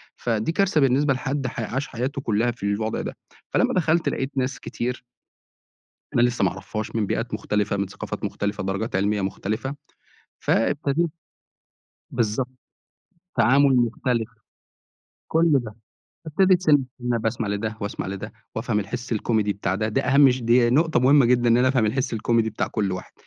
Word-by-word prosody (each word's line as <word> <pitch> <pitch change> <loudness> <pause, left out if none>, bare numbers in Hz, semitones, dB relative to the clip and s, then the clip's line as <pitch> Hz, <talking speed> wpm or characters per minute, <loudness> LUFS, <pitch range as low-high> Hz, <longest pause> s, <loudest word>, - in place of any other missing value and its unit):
فدي 115 +4 -1
كارثة 185 -4 +2
بالنسبة 135 +2 +3
لحدّ 135 +1 -2
ح 125 - -6
عاش 130 +5 -2
حياته 130 +4 -3
كلّها 115 0 +1
في 115 - -13
الوضع 105 +2 -1
ده - - -6 0.4
فلمّا - - +2
دخلت 165 -1 +2
لقيت 135 +2 -3
ناس 130 +1 -1
كتير 125 +1 -4 1.1
أنا 120 - +4
لسه 120 -3 +2
ما 95 - +3
أعرفهاش 105 +3 -6
من 105 -3 +1
بيئات 115 +4 -2
مختلفة، 105 -1 -1
من 100 - -1
ثقافات 100 +1 -6
مختلفة، 100 -1 -2
درجات 95 +3 -2
علمية 100 +1 +1
مختلفة، 110 +8 -3 0.6
فإبتديت 145 +7 +1 1.0
بالضبط، 120 +1 0 0.9
تعامل 135 +4 +5
مختلف، 120 -1 0 1.0
كل 165 0 +3
ده. 120 -6 0 0.5
إبتديت 185 +3 +3
سِنّ 150 -4 +5 0.2
سِنّه 125 -1 -1
باسمع 115 -1 -2
لدّه 110 +2 -2
واسمع 100 -2 -4
لدّه 95 0 -6 0.2
وافهم 105 - 0
الحِس 120 +4 -5
الكوميدي 110 -1 +1
بتاع 95 -2 -2
ده 110 +2 -1
دي 110 - +1
أهَم 140 +1 +5
ش 125 0 -1
دي 120 +1 +4
نقطة 160 +3 +3
مُهمة 135 0 +5
جدًا 120 -1 +3
إن 115 - +5
أنا 130 +1 +4
افهم 125 -4 +2
الحِسّ 125 +3 -1
الكوميدي 115 0 +1
بتاع - - -2
كل 100 -3 -1
واحد. 90 - -7
120 Hz, 160 wpm, -24 LUFS, 105-135 Hz, 1.1 s, تعامل